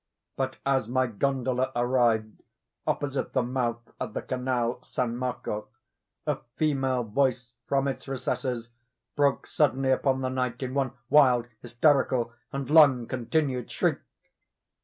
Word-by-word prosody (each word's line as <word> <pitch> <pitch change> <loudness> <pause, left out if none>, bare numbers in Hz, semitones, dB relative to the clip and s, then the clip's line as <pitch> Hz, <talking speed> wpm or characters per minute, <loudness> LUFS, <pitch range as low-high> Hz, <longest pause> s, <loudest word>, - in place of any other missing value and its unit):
But 130 -1 -2
as 135 -4 +2
my 130 +2 +2
gondola 130 +2 0
arrived 120 -3 +1 0.5
opposite 140 -2 -1
the - - +2
mouth 120 -2 -2
of - - -5
the - - -2
canal 125 -1 -1
San 125 -1 -2
Marco, 120 -4 -3 0.6
a 150 -3 0 0.2
female 135 -5 +1
voice 125 +1 0
from 135 0 +1
its 130 -1 -4
recesses 125 -3 -3 0.4
broke 140 -2 +2
suddenly 135 -7 +2
upon 130 0 +2
the 130 - -1
night, 125 -1 -2
in 130 0 -3
one 135 -3 0 0.2
wild, 125 -5 +6 0.2
hysterical, 120 -1 +2 0.2
and 140 -1 -4
long 145 -6 +6
continued 130 0 -1
shriek. - - 0
130 Hz, 130 wpm, -27 LUFS, 120-135 Hz, 0.6 s, wild